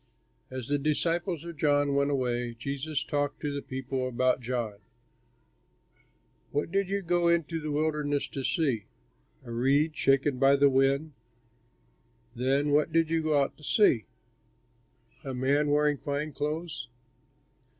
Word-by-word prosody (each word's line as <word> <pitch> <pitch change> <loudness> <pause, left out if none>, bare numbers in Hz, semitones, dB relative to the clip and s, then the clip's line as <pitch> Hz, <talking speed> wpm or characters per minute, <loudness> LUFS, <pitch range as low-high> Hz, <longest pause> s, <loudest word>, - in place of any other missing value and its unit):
As 130 -2 -6
the 145 0 +1
disciples 165 +3 -1
of 170 -2 -8
John 145 -1 +2
went 140 0 +2
away, 125 -3 -1
Jesus 140 +4 -3
talked 145 -2 -2
to 145 -2 -2
the 140 - -3
people 130 -1 -3
about 130 +1 +1
John: 115 -4 -3 1.7
"What 145 +3 -2
did 195 0 0
you 200 0 -1
go 175 0 +2
into 165 -1 +1
the 155 - -4
wilderness 150 -1 0
to 135 - -5
see? 130 - 0 0.6
A 120 - -8
reed 140 +6 +2
shaken 135 -1 +2
by 135 +1 +5
the 140 0 +4
wind? 135 +3 +2 1.2
Then 135 +4 +1
what 150 +2 +3
did 165 0 +2
you 165 0 +2
go 155 -2 +2
out - - -5
to 150 - -18
see? 145 - +3 1.2
A 135 -2 -5
man 140 +4 +2
wearing 150 -1 +2
fine 145 +2 -3
clothes? 155 +2 -4
145 Hz, 140 wpm, -28 LUFS, 135-155 Hz, 1.7 s, by